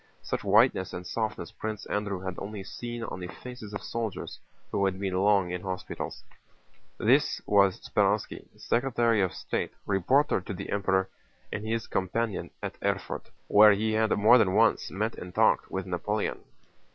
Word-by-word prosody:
Such - - -3
whiteness 95 0 +3
and 90 0 -6
softness 110 +2 -3
Prince 110 -1 -5
Andrew 100 -2 -2
had 95 -1 -4
only 100 -1 -6
seen 120 +3 -6
on 95 - -5
the 90 - -5
faces 125 +1 -9
of 105 - -6
soldiers 115 -4 -4 0.3
who 100 - 0
had 95 -1 -1
been 95 -2 -2
long 95 -1 +3
in 90 0 -3
hospital. 95 -1 -4 0.9
This - - +3
was 100 -2 +4
Speránski, - - 0
Secretary 120 -3 +2
of 95 -2 +1
State, - - -3
reporter 105 - +2
to 95 +2 -6
the - - -6
Emperor 95 -1 +1 0.5
and 105 - -3
his 115 +1 -1
companion 105 +3 -2
at - - -5
Erfurt, - - -2 0.2
where 105 0 +8
he 110 +2 0
had 110 0 +2
more 110 +5 +7
than 95 -3 +2
once 110 0 +3
met 110 +4 -2
and 90 0 -9
talked - - +3
with 95 -1 -3
Napoleon. 100 +4 -2
105 Hz, 165 wpm, -28 LUFS, 95-110 Hz, 0.9 s, where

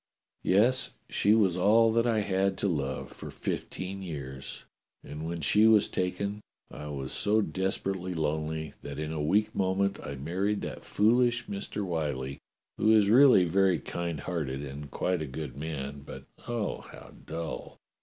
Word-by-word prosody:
Yes, 120 +7 +3 0.2
she 105 +2 +4
was 100 -6 +3
all 110 +4 +5
that 115 +1 +3
I 110 -2 +2
had 95 -1 +1
to 100 - 0
love 75 -7 -2
for - - -9
fifteen 95 +1 -4
years, 70 -7 -6 0.4
and 75 +2 -6
when 85 0 -4
she 105 +9 +5
was 110 -2 +6
taken 100 +3 -2 0.3
I 75 - -7
was 70 -3 -4
so 105 +2 +2
desperately 95 -2 -2
lonely 80 -1 -2
that 70 -1 -7
in 75 +1 -3
a 80 - -2
weak 100 +8 +2
moment 95 +1 +1
I 70 - -6
married 95 +9 -1
that - - -6
foolish 120 +3 +3
Mister 100 0 -4
Whyllie, 75 -6 -2 0.4
who 110 - +3
is 105 -2 +5
really 125 -7 +7
very 95 +1 +3
kind 85 -4 -4
hearted 70 -6 -3
and 70 +1 -7
quite 90 +4 -1
a 75 - -3
good 75 +3 -6
man, 70 -2 -5
but, - - -9 0.2
oh! 120 -3 -2
how - - -13
dull 80 -6 -6
90 Hz, 160 wpm, -29 LUFS, 75-105 Hz, 0.4 s, really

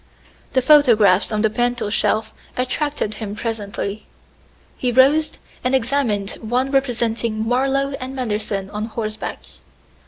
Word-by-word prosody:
The 260 -1 +2
photographs 225 -11 +5
on 215 0 0
the 220 - +4
mantel 240 -2 0
shelf 220 0 0 0.2
attracted 255 -2 -1
him 205 -1 -4
presently. 210 -2 -4 0.7
He 250 - -1
rose 280 +5 +4 0.3
and 255 +1 +2
examined 235 -5 0
one 250 +4 0
representing 235 -4 0
Marlowe 270 +3 +1
and 260 +1 -6
Manderson 210 -5 -2
on 210 +1 -3
horseback. 215 -1 -5
235 Hz, 120 wpm, -20 LUFS, 215-260 Hz, 0.7 s, photographs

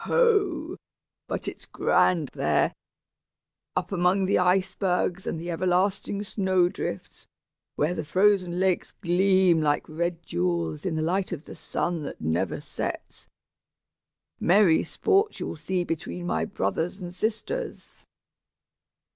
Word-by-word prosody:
Ho! 395 -9 +2 0.5
but - - -3
it's - - -7
grand 165 -7 +2
there, - - +1 1.0
up - - -2
among 185 +1 +2
the 190 - +2
icebergs 185 0 +1
and 165 - -2
the 175 +1 -4
everlasting 185 +3 0
snow 190 -3 +2
drifts, 100 - -6 0.5
where 155 +4 +1
the 160 - -3
frozen 185 +1 +2
lakes 185 -1 +1
gleam 185 -1 +3
like 145 -1 +1
red 170 +2 -2
jewels 85 - -1
in 160 - -1
the 155 - 0
light 185 +4 0
of 160 -4 -5
the - - -9
sun 170 -2 -2
that 145 - -6
never 80 +3 -1
sets! - - -6 1.1
Merry 180 -2 +5
sports 415 0 +1
you'll - - -4
see 175 +3 -1
between 175 +1 -4
my - - 0
brothers 185 -2 -2
and 175 -2 -7
sisters!" 225 - -4
180 Hz, 125 wpm, -26 LUFS, 165-195 Hz, 1.1 s, Merry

